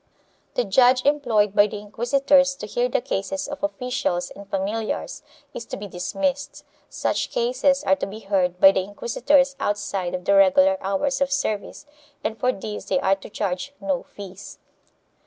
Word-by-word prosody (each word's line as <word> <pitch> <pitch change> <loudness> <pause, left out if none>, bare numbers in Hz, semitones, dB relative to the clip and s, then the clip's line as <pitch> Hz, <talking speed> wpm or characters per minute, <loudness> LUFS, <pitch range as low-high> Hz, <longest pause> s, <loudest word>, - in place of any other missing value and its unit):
The 245 - +2
judge 250 +4 +4
employed 240 -9 +2
by 205 0 +6
the 210 - -6
inquisitors 270 +6 +2
to 240 - -7
hear 240 +4 -1
the 245 - 0
cases 270 +3 -3
of 290 0 -7
officials 250 -11 -2
and 200 0 -12
familiars 210 - -3 0.3
is - - -6
to - - -6
be 205 - -7
dismissed; 275 +10 -3 0.2
such - - -1
cases 475 - +1
are 190 - +3
to - - -3
be 210 +3 -9
heard 185 -3 0
by 195 - +8
the 190 - 0
inquisitors 260 +8 +1
outside 200 -5 -2
of 180 0 -7
the - - +2
Tegular 285 -1 +5
hours 200 +9 -1
of 275 0 +1
service 215 -6 -2 0.4
and 220 - -2
for 255 - +2
this 210 -1 -7
they - - +1
are 195 -8 +2
to 195 - -12
charge 200 +6 -3
no 285 -2 -1
fees. 195 -1 -11
235 Hz, 170 wpm, -23 LUFS, 195-280 Hz, 0.4 s, by